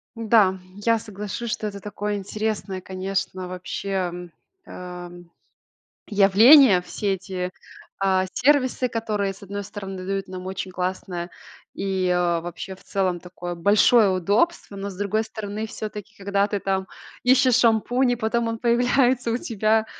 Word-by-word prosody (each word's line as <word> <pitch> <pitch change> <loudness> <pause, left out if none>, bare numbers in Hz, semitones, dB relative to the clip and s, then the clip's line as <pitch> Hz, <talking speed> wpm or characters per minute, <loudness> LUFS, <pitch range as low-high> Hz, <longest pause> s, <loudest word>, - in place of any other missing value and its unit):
Да, 215 -4 +3 0.2
я 230 +2 +2
соглашусь, 210 +2 -5
что 215 - -2
это 200 -1 -6
такое 205 +1 -4
интересное, 205 -1 -3
конечно, 185 0 -3
вообще, 185 +2 -6
м, 180 -2 -3 0.3
а, 180 -1 -8
м, 175 -1 -13 0.8
явление, 210 +2 +7
все 195 +2 -2
эти, 185 -1 -4 0.5
а, 190 -1 +2
сервисы, 255 -2 +2
которые, 210 -4 -2
с 195 - -18
1 200 +1 -5
стороны, 195 -2 -7
дают 195 0 -2
нам 185 0 -7
очень 190 0 -4
классное 180 -1 -3 0.4
и, 190 -1 -1
э, 175 -1 +2
вообще, 175 +2 -7
в - - -21
целом, 185 -3 -1
такое 175 0 -7
большое 205 +4 +5
удобство, 200 - 0
но, 200 +1 -4
с 190 - -9
другой 205 +2 0
стороны, 215 0 -5
всё-таки, 215 -1 -7
когда 200 0 +1
ты 205 -1 -2
там 190 -1 -1 0.4
ищешь 255 -1 +5
шампунь, 245 +2 +3
и - - +1
потом 230 0 0
он 225 0 -3
появляется 245 0 +2
у 235 - +1
тебя, 220 -1 +1
200 Hz, 145 wpm, -24 LUFS, 185-220 Hz, 0.8 s, явление